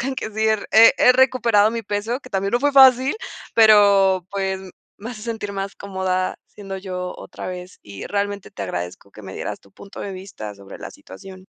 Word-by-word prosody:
reconozcan 265 +2 -2
que 220 - -5
sí 220 +1 -1
he 220 - +4 0.2
he 225 +1 +8
he 250 - +6
recuperado 240 -5 +3
mi 230 0 -4
peso, 210 +5 -3
que - - -15
también 195 0 -2
no 240 - +2
fue 290 0 +1
fácil, 265 - +6 0.4
pero, 200 -4 +5
pues, 190 -1 -2 0.4
me 225 +4 -7
hace 215 -3 -9
sentir 220 -3 -5
más 195 0 -5
cómoda 190 -1 -2
siendo 195 -2 -9
yo 180 -1 -5
otra - - -8
vez, 180 0 -8
y 100 -2 -9
realmente 200 -1 -3
te 100 - -7
agradezco 90 +1 -6
que 105 - -14
me 95 -1 -9
dieras - - -5
tu 100 - -24
punto 200 - -13
de 200 - -5
vista 185 - -8
sobre 100 0 -12
la - - -8
situación. 185 - -13
200 Hz, 200 wpm, -21 LUFS, 185-225 Hz, 0.4 s, he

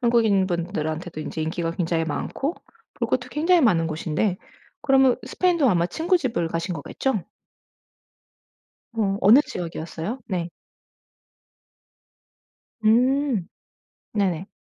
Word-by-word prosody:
한국인 225 -6 +3
분들한테도 170 -2 -3
인제 155 +1 -4
인기가 165 +1 -2
굉장히 165 -1 0
많고 270 - -3 0.4
볼 - - -2
것도 250 0 -1
굉장히 335 +6 +3
많은 180 - +3
곳인데 160 +4 -1 0.4
그러면 265 -2 +4
스페인도 345 -7 +2
아마 175 -5 +2
친구 335 - +1
집을 235 - -1
가신 165 +2 -3
거겠죠? 200 - -2 1.7
어. 205 -4 0
어느 230 +8 +7
지역이었어요? 170 +7 -5
네. 175 -4 -2 2.4
음. 250 -2 +3 0.7
네네. 190 -4 0
195 Hz, 245 characters per minute, -24 LUFS, 165-255 Hz, 2.4 s, 어느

